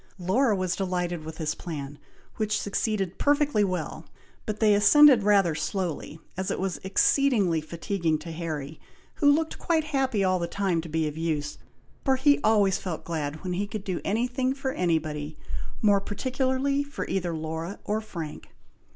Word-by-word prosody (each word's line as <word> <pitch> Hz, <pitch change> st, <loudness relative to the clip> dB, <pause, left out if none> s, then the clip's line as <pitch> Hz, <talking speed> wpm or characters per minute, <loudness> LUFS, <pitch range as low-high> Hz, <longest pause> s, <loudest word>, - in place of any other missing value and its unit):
Laura 210 Hz, +6 st, +2 dB
was 185 Hz, -1 st, -1 dB
delighted 180 Hz, -3 st, -2 dB
with 160 Hz, 0 st, -7 dB
this 155 Hz, -2 st, -2 dB
plan, 145 Hz, -4 st, -7 dB, 0.4 s
which 215 Hz, -1 st, 0 dB
succeeded 200 Hz, -2 st, -2 dB
perfectly 290 Hz, -6 st, +3 dB
well, 185 Hz, -2 st, -3 dB, 0.4 s
but 215 Hz, -1 st, -3 dB
they 215 Hz, -2 st, +5 dB
ascended 260 Hz, +5 st, +7 dB
rather 200 Hz, -4 st, +4 dB
slowly, 160 Hz, 0 st, -3 dB, 0.2 s
as 190 Hz, 0 st, -3 dB
it -, -, -2 dB
was 185 Hz, -5 st, -2 dB
exceedingly 195 Hz, -, +3 dB
fatiguing 170 Hz, 0 st, -1 dB
to 165 Hz, -, -8 dB
Harry, 155 Hz, -3 st, -5 dB, 0.4 s
who 285 Hz, -2 st, +5 dB
looked 315 Hz, +2 st, 0 dB
quite 325 Hz, -2 st, +1 dB
happy 265 Hz, -8 st, 0 dB
all 185 Hz, -1 st, +2 dB
the 170 Hz, -, -2 dB
time 185 Hz, -3 st, 0 dB
to 165 Hz, -, -9 dB
be 160 Hz, 0 st, 0 dB
of 150 Hz, +1 st, -5 dB
use, 150 Hz, -3 st, -2 dB, 0.4 s
for 265 Hz, -, +3 dB
he 285 Hz, +2 st, +4 dB
always 205 Hz, -3 st, +3 dB
felt 175 Hz, -4 st, -5 dB
glad 155 Hz, -1 st, -3 dB
when 180 Hz, -1 st, -2 dB
he 200 Hz, +3 st, -1 dB
could 205 Hz, 0 st, -5 dB
do 185 Hz, -3 st, -3 dB
any 225 Hz, +4 st, +1 dB
thing 255 Hz, +1 st, -1 dB
for 270 Hz, -1 st, -2 dB
anybody, 155 Hz, -, -1 dB, 0.5 s
more 205 Hz, -2 st, +5 dB
particularly 260 Hz, +6 st, 0 dB
for 285 Hz, 0 st, -5 dB
either 175 Hz, -3 st, -1 dB
Laura 160 Hz, +4 st, -4 dB
or 215 Hz, +1 st, -1 dB
Frank. 170 Hz, -8 st, -7 dB
190 Hz, 170 wpm, -27 LUFS, 165-225 Hz, 0.5 s, ascended